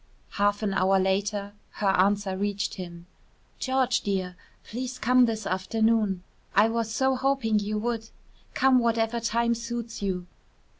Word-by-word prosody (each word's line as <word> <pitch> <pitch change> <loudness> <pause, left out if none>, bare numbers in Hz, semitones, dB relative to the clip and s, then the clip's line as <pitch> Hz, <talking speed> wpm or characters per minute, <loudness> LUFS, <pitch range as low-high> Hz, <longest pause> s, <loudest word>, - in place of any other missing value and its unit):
Half 205 +1 +1
an 200 -2 0
hour 190 +1 +3
later 200 +2 0 0.2
her 200 - 0
answer 195 +1 +2
reached 205 +1 -2
him. 175 -2 -8 0.5
"George 260 -1 +1
dear, 190 -3 -2 0.3
please 255 +2 -5
come 250 +1 +4
this 220 -3 -2
afternoon. 205 0 +1 0.3
I 210 +3 +5
was 230 -1 -1
so 265 +3 +2
hoping 255 -5 +1
you 210 +1 -2
would. 225 0 -2 0.5
Come 265 -1 +5
whatever 230 0 +1
time 235 +1 +1
suits 235 -1 -5
you. 185 -3 -2
215 Hz, 140 wpm, -27 LUFS, 195-235 Hz, 0.5 s, I